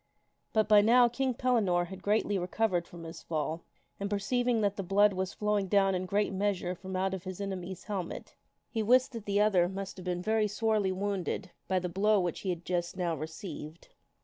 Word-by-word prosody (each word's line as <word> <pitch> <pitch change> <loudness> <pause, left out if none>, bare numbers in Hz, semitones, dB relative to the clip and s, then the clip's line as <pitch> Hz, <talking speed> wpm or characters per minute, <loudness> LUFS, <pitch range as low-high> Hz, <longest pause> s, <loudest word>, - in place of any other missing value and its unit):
But 215 -2 +2
by 210 -1 +7
now 240 +3 +6
King 255 +1 -1
Pellinore 210 -9 +2
had 190 -1 -8
greatly 205 -1 +1
recovered 180 -1 0
from 170 -1 -11
his 165 +1 -8
fall, 160 +1 -2 0.4
and 200 0 -2
per 205 - 0
ceiving 240 +3 +1
that 200 -1 +1
the 200 - -3
blood 200 +2 +4
was 190 0 -2
flowing 210 -2 0
down 195 0 +3
in 185 0 -2
great 205 +1 +1
measure 190 -2 0
from 185 +1 -7
out 190 +1 0
his 185 +1 -7
enemy's 190 -2 -5
helmet, 195 -5 -5 0.4
he 225 - -1
wist 250 +4 +4
that 230 -4 -8
that 200 0 +2
other 190 -4 +4
must 195 0 -6
have 185 - -8
been 180 0 -2
very 220 0 +2
sorely 210 -2 +1
wounded 195 -1 -2 0.2
by 190 - +1
the 180 0 -1
blow 200 +4 +2
which 175 -3 -1
he 190 - -4
had 175 -1 -3
just 175 0 -2
now 175 -3 0
received. 160 0 -8
195 Hz, 200 wpm, -30 LUFS, 180-210 Hz, 0.4 s, by